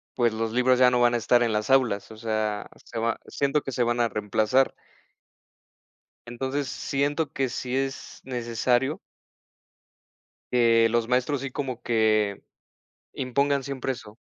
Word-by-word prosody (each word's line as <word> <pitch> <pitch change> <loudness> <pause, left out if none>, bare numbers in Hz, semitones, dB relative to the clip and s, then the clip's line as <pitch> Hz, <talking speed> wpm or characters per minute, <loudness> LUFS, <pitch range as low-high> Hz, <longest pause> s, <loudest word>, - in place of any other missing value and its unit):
pues 120 -3 +2
los 110 0 -2
libros 125 +1 +3
ya 125 -1 +6
no 125 - +2
van 120 0 +4
a - - +3
estar 120 +2 +3
en 115 -2 0
las 105 +2 -1
aulas, 120 -6 +2
o 110 - -11
sea, 110 -2 -2 0.2
se - - -6
va 115 +1 -1
siento 140 +1 0
que 135 - -5
se 125 - -2
van 120 0 0
a 115 - +2
reemplazar. 110 +5 +1 1.6
Entonces 130 +3 -3
siento 145 +4 -1
que 135 -1 0
si 125 +1 -4
es 135 0 -4
necesario. 125 +2 0 1.5
Que 115 -2 +4
los 115 0 0
maestros, 130 +2 +1
así 140 - -4
como 130 -2 -4
que 110 -3 +2 0.7
impongan 140 +2 0
siempre 135 -1 -3
eso 110 -3 -11
120 Hz, 150 wpm, -26 LUFS, 115-135 Hz, 1.6 s, ya